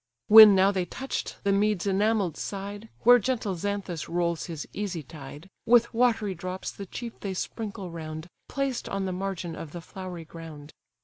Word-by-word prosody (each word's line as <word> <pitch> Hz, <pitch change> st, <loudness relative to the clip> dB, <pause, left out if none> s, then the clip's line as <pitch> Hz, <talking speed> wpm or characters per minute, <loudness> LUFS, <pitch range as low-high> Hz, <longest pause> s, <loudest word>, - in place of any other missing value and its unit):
When 215 Hz, -1 st, +11 dB
now 190 Hz, +1 st, +5 dB
they 185 Hz, -3 st, -1 dB
touch'd 265 Hz, +9 st, -4 dB
the 200 Hz, -, +2 dB
mead's 205 Hz, -1 st, +1 dB
enamell'd 200 Hz, -3 st, +1 dB
side, 205 Hz, +2 st, -6 dB
Where 245 Hz, +1 st, +7 dB
gentle 225 Hz, -3 st, -1 dB
Xanthus 190 Hz, -2 st, -4 dB
rolls 170 Hz, -1 st, -1 dB
his 165 Hz, -4 st, -6 dB
easy 190 Hz, -6 st, -3 dB
tide, 145 Hz, +2 st, -11 dB, 0.2 s
With 235 Hz, 0 st, +5 dB
watery 225 Hz, -4 st, +2 dB
drops 185 Hz, +1 st, -5 dB
the 200 Hz, -, -9 dB
chief 235 Hz, +4 st, -7 dB
they 195 Hz, -2 st, -4 dB
sprinkle 200 Hz, -2 st, -5 dB
round, 160 Hz, -1 st, -6 dB, 0.2 s
Placed 275 Hz, -3 st, -2 dB
on 195 Hz, -1 st, -2 dB
the 185 Hz, -, -2 dB
margin 185 Hz, -3 st, -4 dB
of 155 Hz, -2 st, -8 dB
the 175 Hz, -, -6 dB
flowery 180 Hz, -2 st, -8 dB
ground. 155 Hz, -2 st, -11 dB
195 Hz, 170 wpm, -27 LUFS, 170-210 Hz, 0.2 s, When